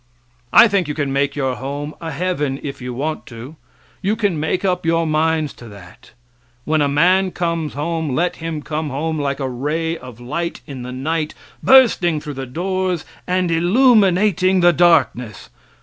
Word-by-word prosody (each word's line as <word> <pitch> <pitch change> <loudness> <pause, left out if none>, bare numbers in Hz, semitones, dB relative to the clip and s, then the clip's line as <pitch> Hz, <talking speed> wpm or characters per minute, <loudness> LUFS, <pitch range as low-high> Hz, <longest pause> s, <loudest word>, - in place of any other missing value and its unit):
I 235 - +8
think 195 -5 0
you 150 - -4
can 140 -3 -2
make 140 +1 0
your 130 -3 -1
home 145 +3 -5
a 165 - -4
heaven 155 -6 -2
if 140 -2 -6
you 125 0 -5
want 150 +6 -4
to 120 +6 -10 0.5
you 200 +3 0
can 205 -8 0
make 160 +5 -1
up 180 -1 0
your 165 0 +1
minds 155 -1 0
to 120 - -13
that. 100 -3 -15 0.5
When 155 0 +1
a 145 - +3
man 180 +7 +3
comes 170 -4 -2
home 160 -2 -2
let 175 +4 0
him 160 -2 -5
come 155 0 -3
home 155 +3 -2
like 140 -1 -2
a 135 - -2
ray 150 +6 -2
of 125 -2 -11
light 160 +8 -4
in 135 -4 -8
the 125 +1 -6
night 155 +4 -2 0.3
bursting 220 -12 +5
through 150 0 -7
the 135 -1 -6
doors 185 +4 -2 0.2
and 180 -1 0
illuminating 190 -1 +3
the 175 0 +5
darkness. 145 - +2
160 Hz, 175 wpm, -19 LUFS, 140-175 Hz, 0.5 s, I